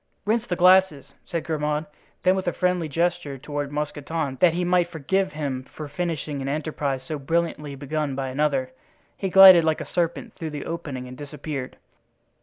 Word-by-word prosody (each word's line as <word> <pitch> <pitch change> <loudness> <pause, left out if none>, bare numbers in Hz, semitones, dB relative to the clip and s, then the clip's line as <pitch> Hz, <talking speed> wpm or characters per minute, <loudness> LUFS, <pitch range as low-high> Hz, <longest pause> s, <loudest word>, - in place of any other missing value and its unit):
"Rinse 225 +2 +1
the 180 - -1
glasses," 180 -5 +5 0.2
said 170 -2 -3
Grimaud. 150 -1 -1 0.4
Then 185 +1 +4
with 190 -1 -3
a 175 - +1
friendly 180 -3 0
gesture 170 -2 -1
toward 145 +1 -4
Mousqueton, 150 -1 -3
that 170 -2 +5
he 180 0 0
might 175 -1 +2
forgive 185 +4 -1
him 140 -4 -3
for 155 - -6
finishing 155 -3 -3
an 135 - -4
enterprise 140 -2 -2
so 155 +1 -5
brilliantly 150 -1 -1
begun 145 0 -3
by 135 -1 -3
another, 135 -1 0 0.4
he 195 - -3
glided 190 -2 +9
like 160 -1 +1
a - - -5
serpent 170 -2 -2
through 160 - -5
the 150 -1 -6
opening 145 -7 -5
and 125 - -9
disappeared. 145 -1 -6
155 Hz, 175 wpm, -24 LUFS, 140-175 Hz, 0.4 s, glided